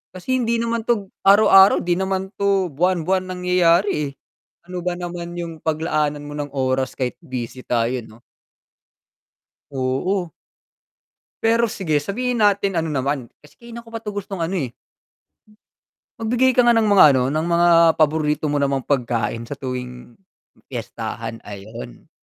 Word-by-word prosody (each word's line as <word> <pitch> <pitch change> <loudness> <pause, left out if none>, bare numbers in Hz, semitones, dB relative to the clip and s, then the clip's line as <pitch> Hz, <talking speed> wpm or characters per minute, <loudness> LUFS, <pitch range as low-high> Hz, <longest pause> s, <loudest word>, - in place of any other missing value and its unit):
kasi 255 +8 -1
hindi 235 -1 0
naman 230 0 -2
'to 210 -5 0 0.2
araw-araw, 195 -1 +7
'di 175 +1 0
naman 190 0 -2
'to 195 -4 +1
buwan-buwan 185 +4 0
nangyayari, 180 +1 +2 0.2
eh, - - -7 0.5
ano 180 0 -6
ba 175 0 -2
naman 175 -1 -6
yung 165 -2 -6
paglaanan 155 -2 -1
mo 145 - -8
ng 145 -1 -4
oras 130 0 -1
kahit 125 -2 -3
busy 125 0 -6
tayo, 120 +1 0
'no? 110 +2 -17 1.5
Oo. 140 +8 -1 1.1
Pero, 230 +1 +3
sige 160 -8 -1
sabihin 240 - -2
natin 200 -2 +2
ano 160 - -3
naman, 135 -3 -2 0.2
kasi 150 - -19
kanina 235 0 -10
ko 230 - -16
pa 225 - -5
'tong 210 -2 -7
gustong 195 -2 -5
ano, 175 +4 -1
eh. 130 -8 -3 1.5
Magbigay 245 +3 +2
ka 250 - +5
nga 240 - +6
ng 225 -2 +2
mga 200 -4 +7
ano 130 - +2
ng 155 +3 -1
mga 170 0 +3 0.3
paborito 150 0 +1
mo 145 - 0
namang 140 -1 +1
pagkain, 115 -4 -1
sa 130 - -10
tuwing 125 -3 -6 0.5
piyestahan, 115 +1 -6
'ayon. 100 - -10
170 Hz, 145 wpm, -21 LUFS, 135-200 Hz, 1.5 s, araw-araw